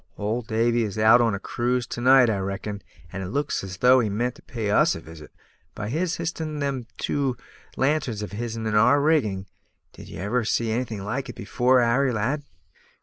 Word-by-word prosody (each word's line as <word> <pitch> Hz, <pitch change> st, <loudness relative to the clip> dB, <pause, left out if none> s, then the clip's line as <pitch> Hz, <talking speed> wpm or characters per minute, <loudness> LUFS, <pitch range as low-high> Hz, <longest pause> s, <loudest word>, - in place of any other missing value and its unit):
"Old 110 Hz, +3 st, -2 dB
Davy 115 Hz, +1 st, +1 dB
is 105 Hz, -2 st, -3 dB
out 110 Hz, +3 st, +6 dB
on 115 Hz, -3 st, +2 dB
a -, -, -5 dB
cruise 125 Hz, +3 st, -1 dB
to 120 Hz, -, -6 dB
night, 130 Hz, 0 st, +6 dB
I 105 Hz, -3 st, 0 dB
reckon; 100 Hz, +1 st, -4 dB, 0.3 s
and 95 Hz, -, -4 dB
it 95 Hz, -, -4 dB
looks 140 Hz, +4 st, -2 dB
as 95 Hz, -1 st, -7 dB
though 125 Hz, +5 st, +5 dB
he 110 Hz, -4 st, 0 dB
meant 120 Hz, +5 st, -1 dB
to -, -, -18 dB
pay 110 Hz, -4 st, -4 dB
us -, -, +4 dB
a -, -, -6 dB
visit, 80 Hz, -1 st, -12 dB, 0.5 s
by 105 Hz, 0 st, -4 dB
his 170 Hz, +6 st, -1 dB
h'isting 160 Hz, -2 st, -4 dB
them 135 Hz, -4 st, -2 dB
two 135 Hz, -4 st, -1 dB, 0.4 s
lanterns 135 Hz, -7 st, 0 dB
of 105 Hz, -, -6 dB
his'n 115 Hz, +1 st, -4 dB
in 110 Hz, -, -1 dB
our 115 Hz, +7 st, +5 dB
rigging. 120 Hz, -11 st, +1 dB, 0.5 s
Did -, -, -12 dB
ye -, -, -9 dB
ever 110 Hz, +7 st, -1 dB
see 115 Hz, 0 st, 0 dB
anything 115 Hz, -4 st, -3 dB
like 130 Hz, +5 st, -3 dB
it 120 Hz, -, -9 dB
afore, 125 Hz, +5 st, +2 dB
Harry, 130 Hz, +3 st, +2 dB
lad?" 120 Hz, +7 st, -1 dB
120 Hz, 205 wpm, -24 LUFS, 105-130 Hz, 0.5 s, out